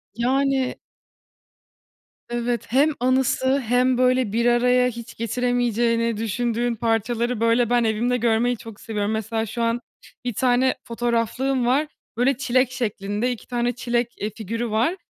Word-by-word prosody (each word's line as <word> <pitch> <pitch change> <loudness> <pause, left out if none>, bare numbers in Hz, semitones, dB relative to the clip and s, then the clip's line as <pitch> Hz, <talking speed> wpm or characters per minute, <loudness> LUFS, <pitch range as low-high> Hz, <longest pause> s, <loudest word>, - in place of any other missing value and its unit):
Yani. 265 +2 +1 1.5
Evet 240 -1 -2
hem 280 +6 +4
anısı 260 +1 +2
hem 250 +1 +2
böyle 255 -3 +2
bir 235 +1 +1
araya 250 +1 +4
hiç 235 0 -9
getiremeyeceğini 235 -1 0
düşündüğün 235 +2 -1
parçaları 230 +1 0
böyle 230 +1 +3
ben 240 -1 +3
evimde 230 +3 +1
görmeyi 235 +1 +1
çok 225 -2 -11
seviyorum. 210 -2 -2
Mesela 220 +1 -2
şu 230 +3 -5
an 230 +1 0 0.4
1 245 - -1
tane 255 +3 +2
fotoğraflığım 240 +2 -1
var, 280 +5 +2 0.3
böyle 250 +1 +2
çilek 255 -1 +1
şeklinde, 215 -1 -2
2 240 - -7
tane 240 0 0
çilek, 240 -1 -1
e 210 - -2
figürü 230 +3 -4
var 230 - +1
240 Hz, 135 wpm, -23 LUFS, 230-250 Hz, 1.5 s, hem